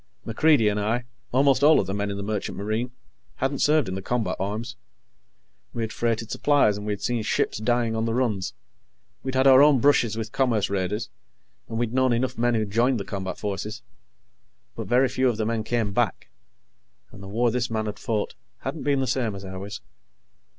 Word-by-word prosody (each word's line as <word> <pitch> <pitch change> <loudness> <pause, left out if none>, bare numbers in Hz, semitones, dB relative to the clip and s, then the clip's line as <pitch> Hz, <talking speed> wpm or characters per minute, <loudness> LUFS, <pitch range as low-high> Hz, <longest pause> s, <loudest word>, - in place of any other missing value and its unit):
MacReidie 115 0 +3
and 105 0 +1
I 115 +4 0 0.3
almost 135 +1 +3
all 155 +2 +7
of - - 0
the 95 - -3
men 100 0 -2
in 100 - -4
the 100 - -4
Merchant 105 -1 -3
Marine 110 +5 -2 0.5
hadn't 135 +1 -1
served 150 -5 +3
in 95 - -3
the 95 - -4
combat 110 -2 -1
arms. 110 +5 -3 1.0
We 115 - -2
had 110 - -4
freighted 115 -1 -1
supplies, 145 -8 +3
and 105 +1 -6
we 105 - 0
had 100 0 -7
seen 120 +1 0
ships 105 - 0
dying 120 0 +1
on 110 0 0
the 115 0 -1
runs 110 -7 -1 0.7
we'd 130 -1 -4
had 130 +1 +3
our 135 0 +8
own 145 -1 +6
brushes 120 -4 +3
with 115 0 -4
commerce 115 -7 +1
raiders, 100 +3 -2 0.6
and 115 - -4
we'd 120 0 -1
known 130 -1 +3
enough 125 +2 0
men 120 0 +1
who 110 -1 +1
joined 115 +4 +1
the 100 - -5
combat 95 -2 -4
forces. 105 +1 -4 0.9
But - - -5
very 125 +2 +4
few 130 0 +1
of 115 - -2
the 110 - -1
men 115 0 -1
came 110 -3 -1
back, - - -1 0.8
and 100 - -12
the 95 - -9
war 115 +4 +1
this 125 0 -1
man 110 -1 -1
had 105 - -5
fought 110 -3 -2 0.3
hadn't 140 +3 -4
been 140 -2 +1
the - - +1
same 120 -4 -1
as 95 0 -8
ours. 95 +2 -7
115 Hz, 205 wpm, -25 LUFS, 105-125 Hz, 1.0 s, our